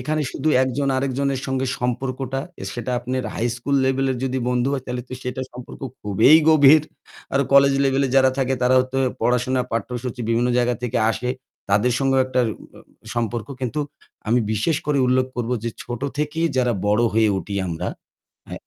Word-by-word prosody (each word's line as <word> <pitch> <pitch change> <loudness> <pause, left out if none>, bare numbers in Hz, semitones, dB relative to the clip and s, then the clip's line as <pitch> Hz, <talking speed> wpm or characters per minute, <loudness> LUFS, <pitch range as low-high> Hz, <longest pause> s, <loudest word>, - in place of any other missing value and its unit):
এখানে 155 +4 -1
শুধু 150 +3 -2
একজন 130 +2 -1
আরেকজনের 135 0 -1
সঙ্গে 130 0 -1
সম্পর্কটা, 130 +2 -2 0.2
এ - - -4
সেটা 120 +1 -3
আপনার 130 +1 -3
হাই 120 - -1
স্কুল 140 +3 -1
লেভেলের 135 0 +1
যদি 130 0 -1
বন্ধু 125 +1 +1
হয় 135 -2 -2
তাইলে 125 -1 -4
তো - - -10
সেটার 130 +1 -4
সম্পর্ক 125 0 -10 0.2
খুবই 105 +6 +4 0.2
গভীর। 155 -1 +7 0.5
আরো 140 +1 +3
কলেজ 140 0 +6
লেভেলে 135 0 +2
যারা 130 0 +5
থাকে 135 0 +1
তারাও 130 +1 +5
হয়তো 130 +1 -2
এ - - 0
পড়াশুনা, 125 +1 +1
পাঠ্যসূচী 120 +2 -3
বিভিন্ন 120 +2 +2
জায়গা 125 0 +2
থেকে 125 0 -1
আসে। 125 +2 -2 0.4
তাদের 110 +5 +3
সঙ্গেও 135 -1 +2
একটা 130 0 0 0.4
আ - - -13 0.3
সম্পর্ক। 120 -1 -2
কিন্তু 130 +4 -2 0.5
আমি 120 +2 +3
বিশেষ 110 +9 +1
করে 150 -2 +1
উল্লেখ 130 0 +2
করব 120 -1 -2
যে 115 - -1
ছোট 120 -1 -6 0.2
থেকেই 150 +2 0
যারা 125 -1 +2
বড় 105 +3 +3
হয়ে 110 0 +3
উঠি 100 - -6
আমরা 80 -1 -3 0.6
আ - - -8
130 Hz, 175 wpm, -22 LUFS, 120-135 Hz, 0.6 s, গভীর